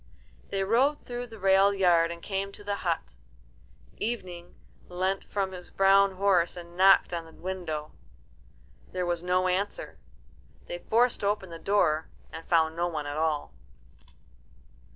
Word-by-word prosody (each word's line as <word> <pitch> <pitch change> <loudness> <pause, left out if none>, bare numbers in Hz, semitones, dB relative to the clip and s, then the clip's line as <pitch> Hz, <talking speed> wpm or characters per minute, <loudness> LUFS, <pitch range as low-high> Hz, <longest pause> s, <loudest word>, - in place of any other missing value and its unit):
They 195 0 -1
rode 255 +9 +2
through 245 0 -5
the 225 -1 -12
railed 195 0 +4
yard 175 -3 +4
and 170 0 -8
came 195 0 -3
to 205 - -10
the 205 0 -2
hut. 165 - -2 0.8
Evening 185 -7 -4 0.3
leant 185 +2 -1
from 195 -2 -2
his 180 -1 -9
brown 195 0 +4
horse 185 -2 +2
and 170 0 -10
knocked 190 0 +5
on 170 -1 -3
the 160 - -14
window. 165 -5 -5 1.0
There 180 -1 -1
was 175 -1 -1
no 180 +1 +1
answer. 190 +3 -2 0.7
They - - -6
forced 240 - +1
open 200 -3 -1
the 165 - -8
door, 160 -6 +1 0.3
and 165 - -9
found 160 -2 +2
no 175 +1 0
one 155 -4 -4
at 145 0 -4
all. 155 -2 -1
185 Hz, 150 wpm, -28 LUFS, 170-200 Hz, 1.0 s, knocked